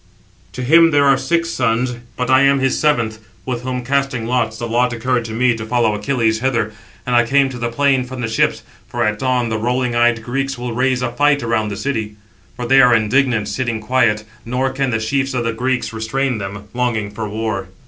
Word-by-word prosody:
To 130 - -5
him 165 +6 +6
there 145 -2 +3
are 135 -1 +5
six 165 +6 -1
sons, 125 -3 0 0.2
but 125 - -1
I 130 +1 +6
am 140 0 +4
his 135 -1 0
seventh; 120 -8 +1 0.3
with 125 -2 -3
whom 125 -1 -4
casting 135 -3 0
lots, 115 -2 -1
the 120 - -4
lot 120 +2 +1
occurred 120 0 -1
to 115 - -6
me 120 +2 +2
to 115 - -6
follow 115 -1 +1
[Achilles] 110 0 0
hither. 115 -4 -1 0.3
And 125 - 0
I 120 - +5
came 135 +3 +2
to 125 -2 -7
the 120 0 -1
plain 135 +1 +2
from 130 0 -8
the 115 - -1
ships, 110 - 0 0.2
for - - -2
at 105 0 0
dawn 125 -2 0
the 110 -1 -2
rolling 125 +1 -1
eyed 120 -1 +2
Greeks 135 +3 -2
will 120 -1 -4
raise 125 +1 0
a 120 - -1
fight 145 +2 +2
around 110 -2 0
the 100 - -5
city. 110 -6 -3 0.4
For 125 0 -5
they 135 +2 +5
are 125 -1 +6
indignant 115 0 +1
sitting 120 -3 -2
quiet, 110 -2 +1 0.2
nor 130 +3 -1
can 135 0 -1
the 110 - 0
chiefs 135 +4 -1
of 120 - 0
the 115 0 -1
Greeks 125 +1 -2
restrain 120 +2 -1
them, 100 +1 -6
longing 120 -4 -1
for 105 0 -5
war." 110 -3 -3
125 Hz, 220 wpm, -18 LUFS, 115-130 Hz, 0.4 s, him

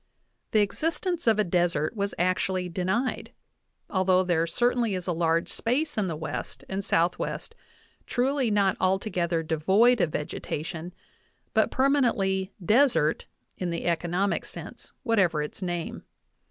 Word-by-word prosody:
The 215 - +3
existence 325 - -1
of 220 -2 +5
a 215 - +3
desert 175 -1 0
was 200 -1 -2
actually 185 0 0
denied, 190 +9 -2 0.5
although 185 -1 +3
there 170 -2 +1
certainly 240 +1 +1
is 180 -1 -4
a 180 - 0
large 165 0 +1
space 290 +7 -1
in 210 -3 0
the 165 - -3
West 155 0 -5
and 195 +1 -3
Southwest 175 - 0 0.5
truly 260 0 +1
not 200 -3 +2
altogether 185 -3 0
devoid 195 +10 +3
of 165 - +1
vegetation, 160 +2 -4 0.6
but - - +3
per 265 +1 +2
manently 195 -9 +1 0.2
"desert" 230 - +3 0.3
in 180 - -1
the 170 0 -3
economic 175 +3 0
sense, - - -10
whatever 185 - +2
its 150 - -7
name. 175 -2 -3
190 Hz, 135 wpm, -27 LUFS, 170-230 Hz, 0.6 s, of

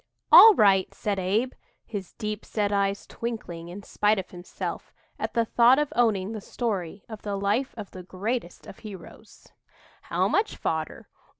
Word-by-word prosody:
"All 445 -2 +11
right," 195 - +4
said 205 -2 -2
Abe, 215 +8 0 0.3
his 200 -4 -7
deep 215 -1 -5
set 205 -2 -1
eyes 200 0 0
twinkling 195 -8 -6
in 195 +3 -9
spite 210 +2 +1
of 190 - -5
himself 175 0 -6 0.3
at - - -4
the 230 -1 +2
thought 240 +3 +5
of 295 -1 -1
owning 215 -5 +2
the 220 -2 -6
story 200 -5 -4
of 220 -2 -9
the 205 -1 -3
life 205 +7 -1
of 210 -3 -8
the 185 - -9
greatest 190 +2 -4
of - - -12
heroes, 205 -4 -12 0.5
"how - - 0
much 430 +2 0
fodder?" - - -3
205 Hz, 165 wpm, -26 LUFS, 190-230 Hz, 0.5 s, All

